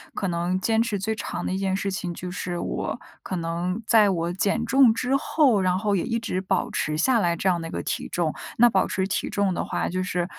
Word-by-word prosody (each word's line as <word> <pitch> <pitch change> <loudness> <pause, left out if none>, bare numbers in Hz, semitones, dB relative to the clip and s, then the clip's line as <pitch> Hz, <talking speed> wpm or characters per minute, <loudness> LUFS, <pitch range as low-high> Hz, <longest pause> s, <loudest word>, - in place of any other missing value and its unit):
可 195 - -1
能 175 +2 0
坚 225 +1 +2
持 225 -3 -1
最 220 +4 -1
长 220 - -5
的 - - -2
一 190 - -1
件 195 -1 0
事 195 0 -2
情， 180 -2 -3
就 180 +1 -6
是 180 -1 -4
我 - - -3 0.2
可 185 - -5
能 175 +5 -2
在 215 -3 +5
我 170 -2 -1
减 205 +5 0
重 260 -3 +5
之 255 +4 +1
后， 275 -8 +3
然 185 0 +2
后 205 0 0
也 - - -1
一 230 - -1
直 215 -5 -2
保 190 -1 -1
持 155 0 -1
下 235 +7 +3
来 170 -3 +1
这 190 +3 0
样 175 -2 +1
的 165 - -5
一 - - -8
个 - - -4
体 - - -3
重。 165 -3 -1 0.2
那 240 +1 +7
保 190 -3 +2
持 190 0 -1
体 - - -2
重 200 -2 +1
的 - - -2
话， - - -2
就 185 +1 -2
是 180 -1 -1
190 Hz, 270 characters per minute, -25 LUFS, 175-220 Hz, 0.2 s, 那